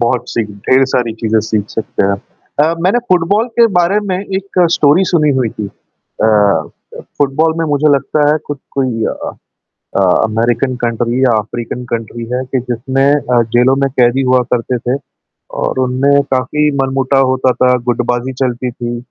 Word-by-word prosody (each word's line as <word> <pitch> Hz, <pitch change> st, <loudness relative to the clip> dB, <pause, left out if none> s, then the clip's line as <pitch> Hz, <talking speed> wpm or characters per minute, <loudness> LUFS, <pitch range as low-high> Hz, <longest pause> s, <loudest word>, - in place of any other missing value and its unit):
बहुत-सी, 120 Hz, -1 st, 0 dB
ढेर 105 Hz, +6 st, +1 dB
सारी 125 Hz, -3 st, -1 dB
चीज़ें 110 Hz, -1 st, 0 dB
सीख 105 Hz, -1 st, -2 dB
सकते 110 Hz, -, -2 dB
हैं। 100 Hz, 0 st, +1 dB, 0.5 s
अ, 165 Hz, -, +1 dB
मैंने 195 Hz, +7 st, +2 dB
फुटबॉल 190 Hz, +6 st, +2 dB
के 235 Hz, -, +7 dB
बारे 190 Hz, +4 st, +2 dB
में 190 Hz, -3 st, -2 dB
एक 195 Hz, -2 st, 0 dB
स्टोरी 155 Hz, +3 st, +4 dB
सुनी 150 Hz, -3 st, +3 dB
हुई 125 Hz, -3 st, +1 dB
थी। 105 Hz, -1 st, -6 dB
अ, 100 Hz, -5 st, -1 dB, 0.5 s
फुटबॉल 155 Hz, +3 st, +1 dB
में 165 Hz, -, 0 dB
मुझे 150 Hz, 0 st, +2 dB
लगता 145 Hz, +2 st, +1 dB
है 155 Hz, -, +2 dB
कु 145 Hz, -, -3 dB, 0.2 s
कोई 125 Hz, -5 st, 0 dB
अ -, -, -4 dB, 0.7 s
अ, -, -, +3 dB, 0.2 s
अमेरिकन 115 Hz, +4 st, 0 dB
कंट्री 120 Hz, +1 st, -1 dB
या 130 Hz, -, +4 dB
अफ़्रीकन 115 Hz, +3 st, -5 dB
कंट्री 115 Hz, 0 st, -4 dB
है 125 Hz, +1 st, -1 dB
कि 130 Hz, +1 st, -2 dB
जिसमें 135 Hz, +4 st, +1 dB
अ, 125 Hz, -4 st, +1 dB
जेलों 130 Hz, +2 st, +4 dB
में -, -, +1 dB
कैदी 125 Hz, +2 st, +3 dB
हुआ 130 Hz, 0 st, +4 dB
करते 125 Hz, +1 st, -1 dB
थे 125 Hz, +3 st, -2 dB, 0.6 s
और -, -, -2 dB
उनमें 130 Hz, +3 st, +2 dB
काफ़ी 150 Hz, +4 st, +1 dB
मनमुटा 135 Hz, 0 st, 0 dB
होता 130 Hz, 0 st, +2 dB
था, 125 Hz, 0 st, +2 dB
गुटबाज़ी 120 Hz, +2 st, -1 dB
चलती 125 Hz, 0 st, -1 dB
थी। 120 Hz, 0 st, -5 dB
130 Hz, 165 wpm, -14 LUFS, 120-145 Hz, 0.7 s, के